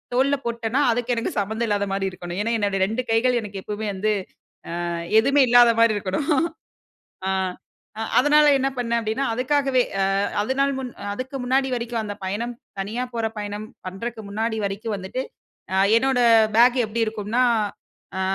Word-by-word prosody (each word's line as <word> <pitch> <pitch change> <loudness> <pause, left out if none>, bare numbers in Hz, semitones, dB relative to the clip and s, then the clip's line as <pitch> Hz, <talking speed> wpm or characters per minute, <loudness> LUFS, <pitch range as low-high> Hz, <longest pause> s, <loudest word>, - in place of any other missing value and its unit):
தோல்ல 275 +2 +3
போட்டன்னா 235 +3 -1
அதுக்கு 245 +1 0
எனக்கு 230 - -1
சம்மந்தம் 220 +3 -2
இல்லாத 205 -1 0
மாரி 195 0 -1
இருக்கணும். 180 +1 -6
ஏனா, 230 +2 -1
என்னுடைய 200 -2 0
2 225 +4 -2
கைகள் 240 +2 +3
எனக்கு 200 -2 -7
எப்பவுமே 210 +1 -4
வந்து 215 +3 0 0.7
ஆ - - -2 0.3
எதுவுமே 275 +3 +3
இல்லாதமாரி 230 -2 +6
இருக்கணும் 200 - -2 1.0
ஆ - - +1 0.9
அதனால 295 +3 +5
என்ன 270 +1 +1
பண்ணேன் 235 -1 0
அப்பிடின்னா, 225 +5 -1
அதுக்காகவே 260 0 +2 0.2
அ - - +3 0.4
அதனால 275 +4 +1
முன் 255 -2 -5 0.2
அதுக்கு 255 +5 -5
முன்னாடி 265 +2 +2
வரைக்கும் 235 -1 -3
அந்த 205 -1 -5
பயணம், 225 +6 -3 0.3
தனியா 220 +6 -3
போற 230 -1 0
பயணம் 205 0 -5 0.2
பண்றக்கு 220 +5 -5
முன்னாடி 220 +2 -2
வரைக்கும் 205 +3 -3
வந்துட்டு. 195 +7 -4 0.5
அ 190 - +1 0.2
என்னோட 265 +1 +2 0.4
பேக் 245 +2 +6
எப்பிடி 225 +1 -1
இருக்கும்னா, 215 +3 -1 0.8
ஆ. - - -1
230 Hz, 150 wpm, -23 LUFS, 210-255 Hz, 1.0 s, இல்லாதமாரி